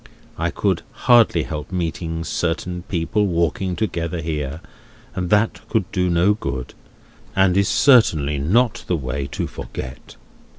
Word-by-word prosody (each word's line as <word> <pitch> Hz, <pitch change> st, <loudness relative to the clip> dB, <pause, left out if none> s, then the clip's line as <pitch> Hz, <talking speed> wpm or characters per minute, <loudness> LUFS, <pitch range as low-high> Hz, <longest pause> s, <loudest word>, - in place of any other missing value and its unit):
I -, -, -1 dB
could -, -, 0 dB, 0.2 s
hardly 115 Hz, -9 st, +5 dB
help 75 Hz, +1 st, -6 dB
meeting 80 Hz, -2 st, -3 dB
certain 90 Hz, +2 st, -2 dB
people 100 Hz, +4 st, 0 dB
walking 85 Hz, +1 st, 0 dB
together 85 Hz, -5 st, -2 dB
here, 80 Hz, -2 st, -3 dB, 0.5 s
and 90 Hz, -2 st, -3 dB
that 105 Hz, +3 st, +2 dB
could 105 Hz, -5 st, 0 dB
do 90 Hz, -1 st, +1 dB
no 85 Hz, +4 st, +3 dB
good, 70 Hz, -, -5 dB, 0.6 s
and 95 Hz, -2 st, +4 dB
is 100 Hz, 0 st, +3 dB
certainly 80 Hz, -, +4 dB
not 110 Hz, -, +2 dB
the 90 Hz, -, +1 dB
way 70 Hz, 0 st, -3 dB
to -, -, -2 dB
forget. 65 Hz, 0 st, -8 dB
85 Hz, 135 wpm, -21 LUFS, 80-100 Hz, 0.6 s, hardly